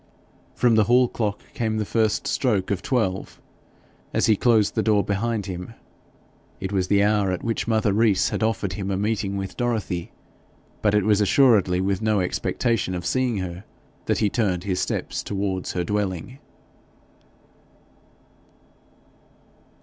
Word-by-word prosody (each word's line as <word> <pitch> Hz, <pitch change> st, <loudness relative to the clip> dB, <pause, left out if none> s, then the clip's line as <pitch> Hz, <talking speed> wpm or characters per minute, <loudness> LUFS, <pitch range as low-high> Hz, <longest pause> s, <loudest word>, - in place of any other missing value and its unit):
From 120 Hz, -2 st, +3 dB
the 110 Hz, -1 st, +4 dB
hall 125 Hz, +3 st, +4 dB
clock 105 Hz, -4 st, -2 dB
came 110 Hz, -2 st, -1 dB
the 105 Hz, -, -1 dB
first 110 Hz, 0 st, 0 dB
stroke 105 Hz, -8 st, 0 dB
of 95 Hz, -2 st, -1 dB
twelve 105 Hz, -8 st, -2 dB, 0.8 s
as -, -, +3 dB
he 110 Hz, -, +4 dB
closed 110 Hz, -1 st, +3 dB
the -, -, +1 dB
door 105 Hz, -2 st, +2 dB
behind 105 Hz, +1 st, -1 dB
him. 90 Hz, +3 st, -7 dB, 0.8 s
It 95 Hz, 0 st, -4 dB
was 95 Hz, -2 st, 0 dB
the 100 Hz, +1 st, +3 dB
hour 105 Hz, -2 st, +2 dB
at 90 Hz, -, -3 dB
which 115 Hz, 0 st, -2 dB
mother 110 Hz, -3 st, +2 dB
Rees 105 Hz, -2 st, +3 dB
had -, -, -3 dB
offered 110 Hz, -4 st, 0 dB
him 95 Hz, +1 st, -4 dB
a 95 Hz, -, -1 dB
meeting 100 Hz, -1 st, -1 dB
with 95 Hz, -1 st, -5 dB
Dorothy; 110 Hz, -8 st, -2 dB, 0.7 s
but 105 Hz, -1 st, +2 dB
it 105 Hz, -, +3 dB
was 105 Hz, -1 st, +3 dB
assuredly 100 Hz, -5 st, +4 dB
with 95 Hz, +1 st, -1 dB
no 110 Hz, -2 st, +2 dB
expectation 95 Hz, +2 st, -1 dB
of 90 Hz, -1 st, -5 dB
seeing 125 Hz, +1 st, 0 dB
her 90 Hz, 0 st, -5 dB, 0.4 s
that -, -, +1 dB
he 105 Hz, -, +2 dB
turned 95 Hz, -7 st, 0 dB
his 95 Hz, -2 st, -1 dB
steps -, -, -2 dB
towards 95 Hz, -2 st, -3 dB
her 90 Hz, -, -1 dB
dwelling. 105 Hz, +5 st, -3 dB
105 Hz, 150 wpm, -23 LUFS, 95-110 Hz, 0.8 s, the